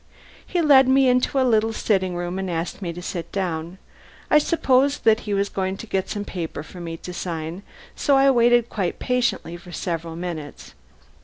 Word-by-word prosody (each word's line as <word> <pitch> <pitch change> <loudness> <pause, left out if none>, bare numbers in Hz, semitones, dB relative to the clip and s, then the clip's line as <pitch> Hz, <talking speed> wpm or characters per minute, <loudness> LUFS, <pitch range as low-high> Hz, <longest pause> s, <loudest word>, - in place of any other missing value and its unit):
He 350 -2 0
led 270 -4 +6
me 265 0 +4
into 250 +2 +2
a 260 - +3
little 225 -2 +2
sitting 190 -4 0
room 175 +2 -3
and 190 -1 -3
asked 170 +3 -3
me 175 -3 -3
to 175 +1 -8
sit 170 -2 -5
down. 175 -2 -3 0.5
I 300 - +7
supposed 280 -3 +2
that 220 -1 +5
he - - 0
was 200 0 +1
going 190 -1 -3
to 230 - -8
get 190 -3 -2
some 205 -1 -4
paper 165 -6 -5
for 180 +3 -11
me 165 -1 -5
to 180 - -8
sign, 170 0 -5 0.3
so 280 -2 +3
I 275 0 +5
waited 240 -1 +4
quite 190 -7 -2
patiently 245 -9 -1
for 175 +1 -13
several 165 -1 -4
minutes. 165 - -7
190 Hz, 190 wpm, -23 LUFS, 175-250 Hz, 0.5 s, I